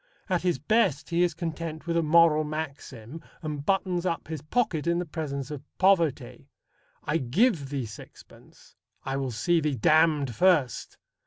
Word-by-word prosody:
At 180 -2 +1
his 180 -4 0
best 155 - +1
he 170 +1 +2
is 175 -3 +1
content 165 -1 -5
with 170 -1 -2
a 170 - +3
moral 160 -1 +4
maxim, 150 -3 -7 0.2
and 150 -2 -4
buttons 185 0 0
up 170 -3 -2
his 160 -3 -5
pocket 170 -2 -1
in 170 0 +2
the 175 - -2
presence 150 -4 -5
of 145 -3 -6 0.2
poverty. 185 -6 +1 0.5
"I 150 - 0
give 150 - +1
thee 135 -3 -3
sixpence! 105 -2 -15 0.3
I 135 0 -2
will 135 -1 -2
see 125 +9 +1
thee 150 -2 0
damned 155 -2 +3
first!" 145 - +1
155 Hz, 160 wpm, -27 LUFS, 140-170 Hz, 0.5 s, moral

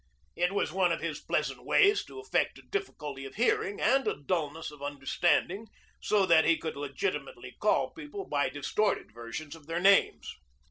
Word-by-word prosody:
It 175 +1 +1
was 200 - 0
one 180 0 +2
of 165 - 0
his - - -3
pleasant - - -2
ways 410 0 +4
to - - -10
affect 410 - 0
a - - -14
difficulty 150 - -5
of 135 - -9
hearing 205 -3 +1
and 270 0 +3
a - - +1
dullness 160 0 -2
of 150 -1 -14
understanding, 170 +8 0 0.3
so 205 -2 +3
that 165 -3 +6
he 165 -1 +3
could 160 - -5
legitimately 145 - -4
call - - +2
people 325 +5 -8
by 140 -2 0
distorted 145 - -1
versions 120 +7 -7
of 155 -2 -17
their 165 +1 -2
names. 195 +2 +3
170 Hz, 175 wpm, -30 LUFS, 145-210 Hz, 0.3 s, that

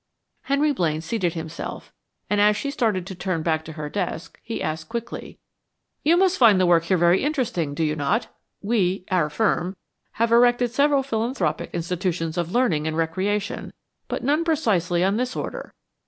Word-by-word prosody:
Henry 285 +2 +2
Blaine 160 - 0
seated 175 -1 -1
himself, 160 0 -6 0.3
and 205 0 +2
as 210 0 +4
she 280 - -3
started 215 -10 0
to 190 - -6
turn 180 -3 -2
back 160 -1 0
to 160 - -9
her 150 -1 -5
desk, 175 -1 -4
he 230 - -5
asked 155 0 -4
quickly: 235 0 -6 0.6
"You 330 +3 +4
must 380 0 +3
find 220 -6 +6
the 185 - +4
work 170 -1 +4
here 185 +2 +2
very 175 +2 +4
interesting, 240 - -1
do 160 - 0
you 155 -1 0
not? 205 - 0 0.4
We 195 -4 0
our 170 -5 +2
firm 185 +2 0 0.4
have 230 +1 0
erected 245 0 +4
several 280 +1 +3
philanthropic 225 - -1
institutions 170 -1 -2
of 175 -1 -2
learning 175 -12 +1
and 160 0 -2
recreation, 190 +5 -2 0.3
but - - -4
none 295 +5 +2
precisely 200 - +1
on 195 +3 +2
this 250 +1 -2
order. - - -5
190 Hz, 170 wpm, -23 LUFS, 165-240 Hz, 0.6 s, find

